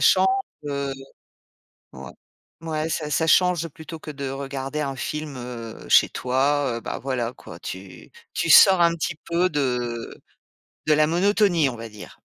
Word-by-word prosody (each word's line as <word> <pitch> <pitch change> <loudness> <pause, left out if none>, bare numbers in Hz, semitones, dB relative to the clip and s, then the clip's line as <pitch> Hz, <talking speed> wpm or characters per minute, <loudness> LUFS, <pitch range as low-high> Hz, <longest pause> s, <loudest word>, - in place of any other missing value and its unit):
change, - - +5 0.4
heu 140 -1 -2 1.0
ouais, - - -10 0.5
ouais, 160 -1 -2
ça 150 -2 -3
ça 160 +3 +1
change 175 -1 +3
plutôt 160 +1 -10
que 155 - -9
de 140 -2 -5
regarder 135 +1 -4
un 135 -2 -3
film, 150 +1 -4
heu, 120 -2 -8
chez - - +6
toi, 135 0 0
heu, - - -10
bah, - - -5
voilà, 125 -3 -2
quoi, 85 - -12
tu 95 +2 -9 0.2
tu - - -1
sors 190 -2 +8
un 170 0 +4
petit 160 -1 -3
peu 175 +2 +2
de 125 -5 -2 0.7
de 155 - +4
la 155 0 +4
monotonie, 175 -2 +3
on 120 - -5
va 115 0 -7
dire. 105 -1 -12
145 Hz, 160 wpm, -24 LUFS, 125-160 Hz, 1.0 s, sors